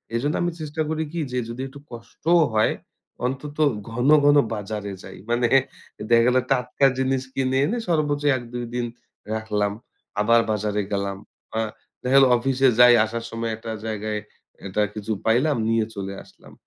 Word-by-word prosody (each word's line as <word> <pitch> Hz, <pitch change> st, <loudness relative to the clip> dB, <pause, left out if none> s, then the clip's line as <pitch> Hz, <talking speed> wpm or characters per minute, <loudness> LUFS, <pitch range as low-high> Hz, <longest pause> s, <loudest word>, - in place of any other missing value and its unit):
এজন্য 145 Hz, +6 st, 0 dB
আমি 175 Hz, 0 st, 0 dB
চেষ্টা 155 Hz, +1 st, -4 dB
করি 160 Hz, 0 st, -1 dB
কি 170 Hz, -, -4 dB
যে, 125 Hz, -, -2 dB
যদি 120 Hz, +3 st, -5 dB
একটু 140 Hz, +2 st, -12 dB
কষ্টও 135 Hz, +9 st, 0 dB
হয়, 110 Hz, 0 st, +3 dB, 0.5 s
অন্তত 140 Hz, +4 st, -4 dB, 0.3 s
ঘন, 125 Hz, +5 st, 0 dB, 0.2 s
ঘন 145 Hz, 0 st, +6 dB, 0.2 s
বাজারে 105 Hz, -1 st, -4 dB
যাই। 95 Hz, -, -10 dB
মানে 120 Hz, 0 st, +2 dB, 0.6 s
দেখা 115 Hz, 0 st, +6 dB
গেল 125 Hz, -, +3 dB, 0.2 s
টাটকা 125 Hz, +1 st, +2 dB
জিনিস 130 Hz, 0 st, +1 dB
কিনে 130 Hz, 0 st, 0 dB
এনে 235 Hz, +8 st, -1 dB
সর্বোচ্চ 150 Hz, -3 st, 0 dB
১ 120 Hz, -, -7 dB
২ 120 Hz, 0 st, -3 dB
দিন 120 Hz, -1 st, 0 dB, 0.5 s
রাখলাম 105 Hz, -2 st, -1 dB, 0.5 s
আবার 115 Hz, +2 st, +5 dB
বাজারে 105 Hz, 0 st, -1 dB
গেলাম। 100 Hz, -1 st, -2 dB, 0.9 s
দেখা 130 Hz, +2 st, +1 dB
গেল 135 Hz, -, +8 dB
অফিসে 135 Hz, +2 st, +2 dB
যাই, 125 Hz, 0 st, +9 dB
আসার 115 Hz, +1 st, -5 dB
সময় 115 Hz, 0 st, -3 dB
একটা 115 Hz, 0 st, -7 dB
জায়গায় 110 Hz, -1 st, -3 dB, 0.5 s
একটা 100 Hz, +2 st, -1 dB
কিছু 105 Hz, +1 st, -5 dB
পাইলাম 130 Hz, +5 st, +3 dB
নিয়ে 115 Hz, -1 st, +2 dB
চলে 100 Hz, 0 st, -5 dB
আসলাম, -, -, -18 dB
120 Hz, 160 wpm, -23 LUFS, 110-135 Hz, 0.9 s, যাই